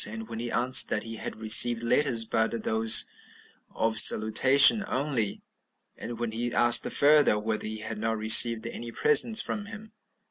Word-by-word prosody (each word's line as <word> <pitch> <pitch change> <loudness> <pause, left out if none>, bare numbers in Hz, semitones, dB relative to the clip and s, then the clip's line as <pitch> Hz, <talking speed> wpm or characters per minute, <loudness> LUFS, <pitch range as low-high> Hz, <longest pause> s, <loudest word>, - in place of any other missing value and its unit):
and 110 +1 -13
when 115 -1 -11
he 120 +1 -9
answered 125 +2 +2
that 105 - -6
he 115 0 -13
had - - -12
received 115 +2 +2
letters, 120 -2 -1
but 115 0 -6
those 110 0 +2 0.6
of 110 -1 -1
salutation 135 - +3
only; 130 -6 -6 0.5
and 120 0 -12
when 120 -1 -8
he 120 +2 -8
asked 120 0 +2
further, 145 -6 0
whether 110 0 -8
he 110 0 -11
had 110 0 -11
not 110 +1 -6
received 110 +1 +3
any 115 0 -11
presents 235 - +1
from 205 -1 -9
him? 220 0 -16
115 Hz, 165 wpm, -22 LUFS, 110-130 Hz, 0.6 s, salutation